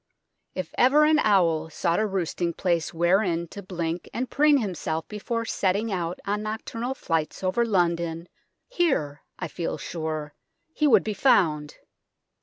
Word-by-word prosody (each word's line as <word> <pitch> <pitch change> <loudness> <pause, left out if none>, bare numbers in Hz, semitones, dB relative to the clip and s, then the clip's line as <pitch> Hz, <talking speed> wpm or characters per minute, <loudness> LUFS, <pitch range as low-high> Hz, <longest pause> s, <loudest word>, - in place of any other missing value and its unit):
If 185 -3 -5
ever 275 +5 +6
an 310 0 +4
owl 170 - +3
sought 170 +3 0
a 215 - +1
roosting 175 -3 -2
place 170 -4 0
wherein 170 0 +1
to 200 - -8
blink 175 -2 -4
and 255 +2 -3
preen 295 0 +5
himself 170 - -3
before 230 +2 -3
setting 205 +1 0
out 175 -2 -2
on 205 +1 -1
nocturnal 230 +4 -4
flights 165 -5 -2
over 185 +6 +2
London, 170 -5 0 0.4
here, 265 - 0 0.2
I 180 - -4
feel 165 +2 -4
sure, 155 -3 -4 0.4
he 300 - +2
would 270 - +5
be 215 - -2
found. 155 - +2
185 Hz, 145 wpm, -25 LUFS, 165-220 Hz, 0.4 s, ever